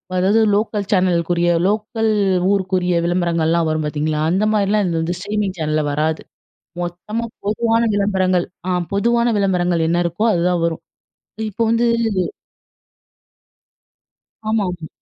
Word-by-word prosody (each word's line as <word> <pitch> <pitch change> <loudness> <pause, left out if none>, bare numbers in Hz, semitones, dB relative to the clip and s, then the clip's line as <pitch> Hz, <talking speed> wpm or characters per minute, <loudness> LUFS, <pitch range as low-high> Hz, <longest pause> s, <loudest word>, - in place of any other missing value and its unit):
அதாவது 190 +4 +3
local 205 -1 0
சேனலுக்குரிய 175 -2 +2 0.2
local 220 +2 0 0.4
ஊருக்குரிய 185 -2 0
விளம்பரங்கள்லாம் 170 -2 +1
வரும், 155 0 -1
பார்த்தீங்களா? 150 0 -1
அந்த 190 +5 +1
மாதிரிலாம் 210 0 +2
இதுல 165 -2 -1
வந்து 170 +2 -2
ஸ்ட்ரீமிங் 205 0 -2
சேனல்ல 155 -1 0
வராது. 155 +2 -1 0.6
மொத்தமா 180 +7 -4 0.2
பொதுவான 225 +2 +1
விளம்பரங்கள் 190 -3 +1 0.2
அ - - -1 0.2
பொதுவான 235 +4 +2
விளம்பரங்கள் 180 -4 +1
என்ன 170 - +1
இருக்கோ, 170 +6 -1
அதுதான் 175 0 +1
வரும். 165 0 -3 0.7
இப்ப 210 - -18
வந்து 230 +1 +2 2.6
ஆமாமா. 180 -7 -1
180 Hz, 110 wpm, -19 LUFS, 170-210 Hz, 2.6 s, அதாவது